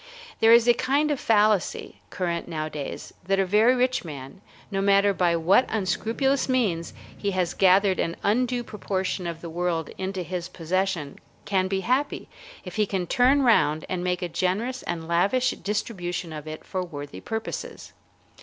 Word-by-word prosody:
There 225 0 +6
is 235 0 +7
a 240 - +7
kind 285 +5 +1
of 285 - -1
fallacy 210 -3 +1
current 170 -2 -3
nowadays 155 -3 -5
that 195 +2 +1
a 195 - +2
very 215 +6 +4
rich 255 +1 +1
man, 145 +2 -9 0.3
no 195 0 0
matter 200 0 +4
by 175 -2 +2
what 180 +10 +3
unscrupulous 225 +7 0
means 200 -11 0 0.2
he 200 - -2
has 180 -2 0
gathered 190 0 +4
an 165 - -1
undue 245 +3 +1
proportion 190 -4 -3
of 165 -1 -5
the 170 - -6
world 170 -2 -1
into 190 -1 -3
his 180 0 -5
possession, 180 -3 -2 0.3
can 190 -2 +1
be 190 0 -1
happy 260 +7 -1 0.4
if 180 +3 -7
he 210 -1 +2
can 190 -3 -2
turn 260 +8 +3
round 155 - +3
and 180 -1 -3
make 180 0 -1
a - - -1
generous 190 +9 -1
and 165 -1 -5
lavish 200 +10 +2
distribution 180 -4 -4
of 155 0 -8
it 155 0 -7
for 185 - -3
worthy 145 -5 -7
purposes. 225 -1 -6
190 Hz, 165 wpm, -25 LUFS, 170-225 Hz, 0.4 s, is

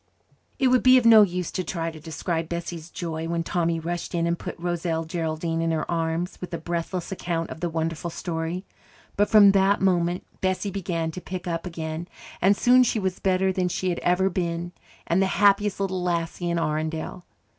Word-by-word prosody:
It 265 - +3
would 255 0 +4
be 255 0 +7
of 250 - +2
no 225 -2 +9
use 180 -3 0
to 185 - -2
try 165 -2 -3
to 160 - -11
describe 160 +1 -3
Bessie's 170 -1 -5
joy 165 -3 -4
when 170 0 -1
Tommy 165 -1 0
rushed 175 +2 -4
in 170 -1 +1
and 170 0 0
put - - -6
Roselle 170 -1 -2
Geraldine 165 0 -2
in 165 - 0
her 160 -1 0
arms 165 +1 -2
with 180 - -6
a - - -3
breathless 170 +2 -3
account 170 -3 -3
of - - -7
the 175 - -1
wonderful 165 +1 -2
story. 170 +2 -4 0.5
But 205 +1 +2
from 205 -2 +8
that 195 +1 +3
moment 175 -2 +1 0.2
Bessie 190 +2 0
began 165 -4 -2
to 185 - -7
pick 185 -1 -6
up 170 +1 -2
again, 160 0 -5 0.3
and 200 +2 +4
soon 250 +1 +6
she 245 - +2
was 190 -3 -2
better 190 0 +2
than 185 -1 0
she 185 +1 -1
had 175 - -1
ever 180 +2 +2
been 175 -2 -2 0.3
and 175 +3 +2
the 195 - +3
happiest 205 0 +3
little 190 -2 -1
lassie 175 0 -1
in 170 - 0
Arundel. 160 +2 -2
175 Hz, 200 wpm, -25 LUFS, 165-190 Hz, 0.5 s, no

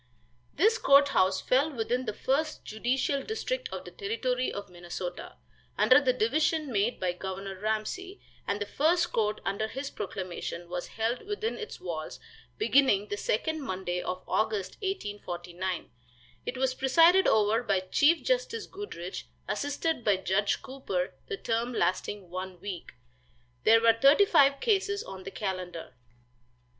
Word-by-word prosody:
This 440 +8 +4
court 280 - +6
house 190 -6 +3
fell 275 +5 +2
within 245 0 -1
the 215 - -1
first 300 +8 -1
judicial 255 +5 0
district - - -3
of - - -6
the - - -9
Territory 255 - -1
of 200 - -6
Minnesota, 175 0 -7 0.4
under 255 +3 +6
the 260 -3 +3
division 300 +5 +1
made 215 +2 +1
by 185 -1 0
Governor 190 +1 -5
Ramsey, 220 - -3 0.3
and 200 - 0
the 205 - -2
first 325 - +2
court 215 -1 0
under 200 +3 -1
his 270 +5 -5
proclamation 180 -3 -5
was 175 0 -4
held 230 - -1
within 425 +2 -2
its 440 -2 -7
walls, 160 -3 -5 0.4
beginning 265 - +3
the - - -1
second 315 +10 -1
Monday 185 -6 -3
of 180 +1 -4
August, 215 -3 0
1849. 185 - -4 0.6
It 255 - -3
was 260 0 +1
presided 330 +9 +5
over 215 +2 +3
by 200 -6 +1
Chief 290 - +3
Justice - - 0
Goodrich, 285 - -7 0.2
assisted 290 -1 -1
by 205 -3 +3
Judge 195 +2 0
Cooper, 275 - -3
the 415 - -3
term 235 -2 -1
lasting 185 +1 -1
one 185 0 -5
week. 185 -2 -7 0.7
There 225 +1 +7
were 230 0 +6
thirty 275 - +6
five 280 -6 +5
cases 405 -2 +1
on 190 -1 -9
the - - -4
calendar. 185 -4 -5
230 Hz, 145 wpm, -29 LUFS, 190-305 Hz, 0.7 s, There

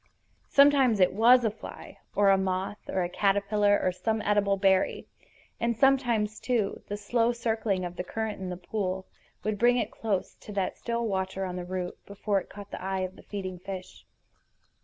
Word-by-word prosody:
Sometimes 275 -6 +5
it 185 - +4
was 240 +4 +6
a 220 - +2
fly, 215 - -11 0.2
or 200 -1 +5
a 195 - +5
moth, 190 +2 -3
or 185 - 0
a - - 0
caterpillar 205 +1 +2
or 185 - +2
some 220 +4 -1
edible 200 -1 +2
berry. 190 -1 +2 0.5
And 235 -1 0
sometimes, 240 -5 +2
too, 230 -6 -1
the 205 - -4
slow 230 +3 +1
circling 220 -5 -1
of 175 0 -7
the - - -2
current 220 +2 -4
in 185 - -4
the 180 - -4
pool 190 0 -3 0.4
would 215 -1 -2
bring 245 +1 +5
it - - -1
close 205 -5 -2
to - - -12
that 195 -2 -1
still 235 0 -2
watcher 190 -2 -2
on 180 -1 -4
the 180 -1 -5
root 180 0 -5
before 200 0 -1
it - - -15
caught 205 0 -10
the - - -6
eye 190 0 -2
of 185 0 -4
the - - -14
feeding 185 -3 -6
fish. 190 0 -8
200 Hz, 190 wpm, -28 LUFS, 190-225 Hz, 0.5 s, was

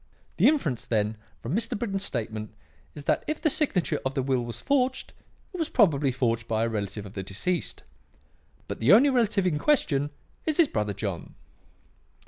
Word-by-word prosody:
The - - +5
inference, 165 - +1
then, 110 -1 0 0.3
from 130 +9 -2
Mr. 225 -1 0
Britton's 200 -3 -2
statement 110 -3 -4 0.4
is, 145 - -8
that - - +1
if 310 - -2
the 310 - +2
signature 230 - +1
of 135 +1 -2
the 135 - 0
will 130 -2 +1
was 120 -1 -6
forged, 260 -2 0 0.4
it - - -5
was 325 - -1
probably 150 - +3
forged 115 -2 -1
by 110 0 0
a 115 - +1
relative 105 -1 -3
of 100 - -10
the 95 - -4
deceased. 105 - -2 0.8
But - - -5
the 125 +11 +5
only 270 +7 +7
relative 220 -6 +2
in 155 -5 +1
question 145 - +2 0.3
is 310 -2 0
his 335 -4 +5
brother 105 -1 -1
John. 100 -4 -5
140 Hz, 180 wpm, -27 LUFS, -, 0.8 s, only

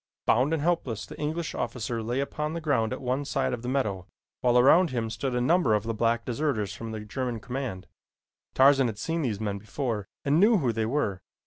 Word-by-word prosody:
Bound 130 +6 +3
and 160 -3 0
helpless, 145 -11 -1
the - - -10
English 155 +2 -2
officer 120 -1 -3
lay 120 +4 -1
upon 150 +2 -3
the - - -2
ground 140 -9 +1
at 130 - -3
one 130 +3 0
side - - -1
of 120 - -4
the 125 - -4
meadow, 105 -9 -1 0.3
while 125 -1 +3
around 160 +8 +6
him 115 -4 -2
stood 125 +3 -2
a - - +1
number 130 -3 +3
of 105 - 0
the 115 - -2
black 115 +1 +1
deserters 115 -6 -1
from 115 +2 -7
the 110 -1 -5
German 120 +2 -3
command. 125 -6 -5 0.7
Tarzan 135 -1 +6
had 110 -3 -4
seen 165 +8 -2
these 115 -8 -1
men 100 -2 -2
before 110 -1 -3 0.2
and 145 +3 +3
knew 215 +3 +6
who 130 -9 0
they 110 0 -1
were. 110 -8 -1
125 Hz, 215 wpm, -27 LUFS, 110-145 Hz, 0.7 s, around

